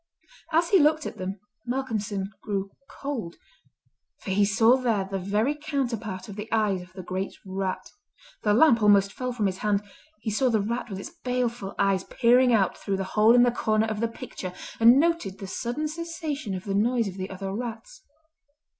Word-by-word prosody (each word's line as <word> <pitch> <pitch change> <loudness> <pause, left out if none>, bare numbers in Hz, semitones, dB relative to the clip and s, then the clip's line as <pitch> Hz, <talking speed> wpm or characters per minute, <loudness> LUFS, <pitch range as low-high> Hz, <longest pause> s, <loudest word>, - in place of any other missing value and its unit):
As 335 +1 +3
he 390 - +6
looked 310 0 +3
at - - -6
them, 190 +2 -4 0.3
Malcolmson 215 -6 -2
grew 195 -2 -3 0.2
cold, 250 -12 -5 0.9
for 195 - -5
he 205 +2 +3
saw 225 +4 +5
there 230 -7 0
the 195 0 -3
very 210 +9 +1
counterpart 240 -11 -3
of 200 - -8
the 210 +2 -7
eyes 210 -4 +1
of 180 +1 -13
the 185 -1 -8
great 185 +2 -4
rat. 190 0 -3 0.5
The 210 -1 +3
lamp 235 -3 +5
almost 200 -1 +5
fell 255 -1 -3
from 230 -4 -1
his 190 -1 -1
hand, 205 -1 +1 0.4
he 220 - -3
saw 255 +5 +2
the 225 -2 +2
rat 235 +4 -2
with 195 - -5
its 195 - -7
baleful 245 -5 -2
eyes 195 -1 +2
peering 245 +1 +4
out 200 -5 +2
through 195 -1 -2
the 195 - -1
hole 220 +2 +6
in 245 - +7
the 245 - +4
corner 215 -2 +1
of 220 -1 -3
the 230 - +1
picture, 225 -6 -7 0.3
and 235 +4 +7
noted 330 - 0
the 195 - -7
sudden 245 +10 -3
cessation 305 - -4
of 185 - -6
the 200 - -3
noise 230 +3 +2
of 190 0 -7
the 190 +1 -4
other 195 0 -5
rats. 240 - -6
220 Hz, 190 wpm, -26 LUFS, 195-250 Hz, 0.9 s, in